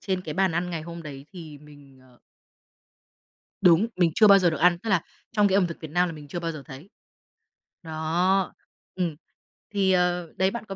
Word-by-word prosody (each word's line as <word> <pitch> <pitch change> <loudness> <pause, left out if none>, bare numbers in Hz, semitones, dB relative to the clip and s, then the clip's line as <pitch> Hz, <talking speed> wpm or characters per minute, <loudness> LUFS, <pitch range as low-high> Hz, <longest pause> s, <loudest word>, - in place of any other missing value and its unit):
trên 190 -2 -2
cái 155 -4 -6
bàn 190 -1 +2
ăn 175 +2 -2
ngày 165 -2 -4
hôm 170 +1 -8
đấy 140 -3 -9
thì 160 -5 -10
mình, 145 -2 -17
ờ 125 -1 -23 1.4
Đúng, 180 +4 +5
mình 175 -3 +2
chưa 215 - +6
bao 200 -1 +8
giờ 180 -3 +3
được 160 - -3
ăn, 175 0 +4
tức 220 +4 -5
là, 185 -4 +3 0.3
trong 210 -2 +3
cái 190 - 0
ẩm 195 -3 +3
thực 170 - -8
Việt 160 - -8
Nam 180 +3 +2
là - - -5
mình 150 -2 -11
chưa 175 +4 -5
bao 165 -1 -3
giờ 155 -3 -8
thấy. 145 +4 -11 0.9
Đó. 170 +4 0 0.4
Ừm. 175 -5 -2 0.6
Thì, 195 -2 +2
ờ, 180 -2 0
đấy 190 +1 +2
bạn 235 0 -6
có 195 - -7
175 Hz, 210 wpm, -25 LUFS, 155-190 Hz, 1.4 s, bao